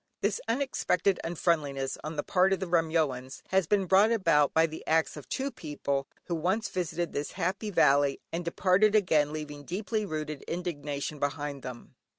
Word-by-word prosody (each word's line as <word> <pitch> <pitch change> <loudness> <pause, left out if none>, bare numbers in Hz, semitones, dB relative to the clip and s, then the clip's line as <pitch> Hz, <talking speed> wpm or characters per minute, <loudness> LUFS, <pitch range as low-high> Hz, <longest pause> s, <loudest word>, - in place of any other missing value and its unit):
This - - 0
unexpected 215 -8 +1
unfriendliness 150 -5 0
on 155 +1 -5
the 145 - -1
part 190 0 +3
of 195 - -1
the 190 - -2
Remyoans 160 -7 0
has 190 -3 +2
been 200 0 +2
brought 195 +5 +5
about 165 -10 +3
by 160 0 +4
the 160 -1 -7
acts 160 0 +2
of 150 - -10
two 275 +1 -2
people, 140 - -3 0.2
who 175 - -4
once 185 +7 0
visited 175 -2 -2
this 145 +1 -3
happy 190 +4 -2
valley, 140 -6 +3
and 170 +1 -2
departed 190 +5 +3
again 155 -8 +3
leaving 150 -1 -6
deeply 210 - -2
rooted 155 -5 -4
indignation 150 -4 -4
behind 145 -1 -2
them. 125 -2 -9
165 Hz, 165 wpm, -29 LUFS, 145-190 Hz, 0.2 s, brought